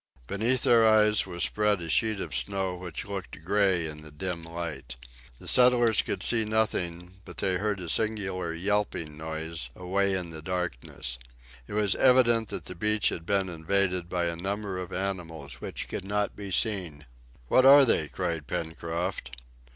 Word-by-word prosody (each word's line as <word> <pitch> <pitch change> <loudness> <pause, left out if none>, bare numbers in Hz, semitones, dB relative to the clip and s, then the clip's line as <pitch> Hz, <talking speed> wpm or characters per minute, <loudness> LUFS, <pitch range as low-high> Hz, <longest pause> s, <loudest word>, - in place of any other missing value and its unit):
Beneath 115 - +1
their 115 -1 +5
eyes 105 -2 +4
was 85 -2 -2
spread 105 -2 +1
a 85 - -6
sheet 110 +5 +1
of 85 -6 -5
snow 90 +9 -1
which 90 -3 -6
looked 95 -6 -7
gray 95 -3 +2
in 75 -1 -5
the 75 - -10
dim 85 +3 -4
light. 85 -6 -6 0.4
The - - -10
settlers 120 -3 +5
could - - -3
see 115 -2 +3
nothing, 90 -5 -2
but 90 - -12
they 95 -1 +1
heard 105 +1 -1
a 90 - -6
singular 95 -3 -1
yelping 90 -3 -2
noise 80 +1 -4
away 95 +2 0
in 90 -3 -3
the 80 -1 -6
darkness. 80 -8 -4 0.5
It - - -8
was 105 -2 +2
evident 120 -3 +4
that - - -5
the - - -6
beach 105 +4 +1
had 85 - -6
been 100 -1 +1
invaded 90 +1 -1
by 90 -1 -1
a 85 0 -2
number 100 +2 -3
of 90 0 -6
animals 90 -4 -5
which - - -5
could - - -5
not 105 +1 -1
be 100 -1 -7
seen. 90 -8 0 0.4
"What 130 - +4
are 140 +1 +9
they?" 80 -10 +2
cried 80 -4 -3
Pencroft. 85 -2 -3
95 Hz, 170 wpm, -28 LUFS, 85-105 Hz, 0.5 s, are